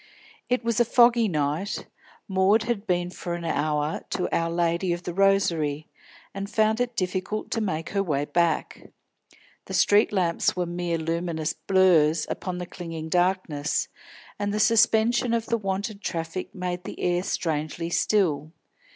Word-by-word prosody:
It 250 0 +1
was 230 -1 0
a - - +6
foggy 235 -1 +4
night. 155 +3 -2 0.4
Maud 195 +3 +3
had 225 -2 -3
been 175 -1 0
for 175 -1 -5
an 170 -1 -6
hour 150 -1 -1
to 180 - -1
Our 165 0 0
Lady 170 +1 0
of 175 +1 -5
the 175 - -4
Rosary, 170 -6 +1 0.4
and 195 0 -5
found 220 +2 +2
it 245 -1 -2
difficult 185 +3 -2
to 225 - 0
make 165 -6 -2
her 200 - 0
way 145 -6 -1
back. 165 +1 -1 0.8
The - - -5
street 205 +1 +4
lamps 180 -4 +1
were 180 -1 -1
mere 175 -1 -2
luminous 165 -1 -2
blurs 165 -5 +3
upon 180 -1 -4
the 180 - -4
clinging 165 -3 -7
darkness, 175 -4 0 0.5
and 205 0 -1
the 210 - -1
suspension 230 +2 +3
of 230 -1 -1
the 230 - 0
wonted 200 +1 -3
traffic 165 +1 -4
made 180 -1 -3
the - - -8
air 175 0 +1
strangely 165 -1 -2
still. 160 -7 +1
180 Hz, 155 wpm, -25 LUFS, 165-205 Hz, 0.8 s, a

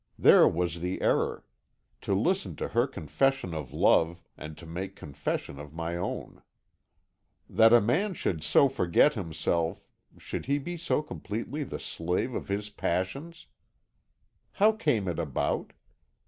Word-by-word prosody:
"There - - +7
was 85 -1 -1
the 90 +2 -3
error. - - 0 0.6
To 100 - 0
listen 185 - 0
to - - -4
her 120 +3 +2
confession 135 -7 0
of 75 -5 -5
love, 85 +1 +3
and 75 0 -9
to 85 - -11
make 95 +4 -6
confession 70 -1 -4
of 75 +1 -10
my 85 +1 -3
own. 90 +2 -5 1.1
"That 115 0 +5
a 120 - +8
man 175 - +1
should 80 - -2
so 80 - +5
forget 130 - +3
himself 85 0 -2 0.3
should - - -6 0.2
be 175 +4 -4
so 165 -2 0
completely 140 +5 -5
the - - -6
slave 90 +9 -2
of - - -4
his 105 +1 -3
passions! 105 - -3 1.1
"How 210 +2 +5
came 115 - 0
it 85 -2 -2
about? 75 -6 -1
95 Hz, 140 wpm, -28 LUFS, 85-135 Hz, 1.1 s, a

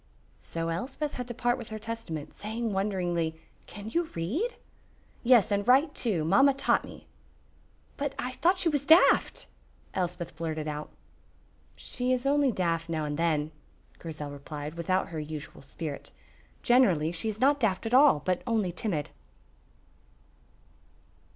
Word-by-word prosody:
So 165 0 -3
Elspeth 265 - -3
had 250 -1 -5
to 240 - -6
part 245 +1 +1
with 235 - -8
her 220 - -5
Testament, 215 -9 -6
saying 220 +1 -3
wonderingly, 175 -5 -1 0.3
"Can 205 0 -9
you 335 +4 0
read?" 265 - -1 0.7
"Yes, 235 -4 +5
and 200 +1 0
write 280 +4 +5
too. 190 -10 -1
Mamma 265 - +5
taught 275 - +2
me." - - -12 0.9
"But 285 -1 -2
I 250 - -3
thought 355 +8 +2
she 365 - 0
was 290 -4 +1
daft," 320 +5 +5 0.5
Elspeth 175 -3 -3
blurted 160 -1 -3
out. 150 0 -4 0.9
"She 250 0 -2
is 255 0 0
only 280 -1 +3
daft 165 -4 -1
now 160 -2 -1
and 145 0 -3
then," 155 -2 0 0.5
Grizel 150 -3 -6
replied, 145 +1 -7
without 175 +3 0
her 165 -2 -5
usual 150 0 -7
spirit. 145 +2 -6 0.5
"Generally 185 -11 +4
she 175 +6 -3
is 215 0 -5
not 285 +2 +4
daft 220 -4 0
at 225 - -2
all, 260 - +6
but 185 -1 +1
only 220 -6 +1
timid." 170 -5 -3
195 Hz, 145 wpm, -28 LUFS, 165-250 Hz, 0.9 s, all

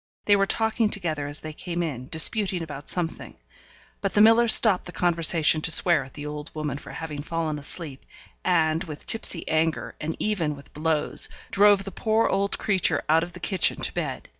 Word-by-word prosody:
They 205 - +4
were 195 0 +1
talking 220 0 +1
together 160 -8 -3
as 145 +1 -6
they 155 0 -8
came 175 +2 -4
in, 130 -6 -6
disputing 185 +2 +2
about 145 -2 -9
something; 175 -3 -4 0.6
but 195 - -3
the 205 - +4
miller 225 +2 +5
stopped 220 -4 +6
the 175 - -9
conversation 165 -3 +2
to 165 - +2
swear 165 -2 +5
at 135 - -15
the 145 - -7
old 150 +1 -7
woman 150 -3 -4
for - - -13
having 150 -3 -7
fallen 155 -1 -4
asleep, 145 -1 -3 0.4
and, 165 -2 +1
with 150 -3 -9
tipsy 205 -6 +2
anger, 160 0 -1
and 160 +1 -4
even 170 -9 -2
with 140 - -16
blows, 155 0 0 0.2
drove 200 0 +4
the 195 - -7
poor 220 +4 0
old 200 +1 -1
creature 195 -4 0
out 160 +1 +4
of 175 +1 -6
the 180 - -10
kitchen 180 +3 +1
to - - -1
bed. - - -5
165 Hz, 190 wpm, -24 LUFS, 155-195 Hz, 0.6 s, stopped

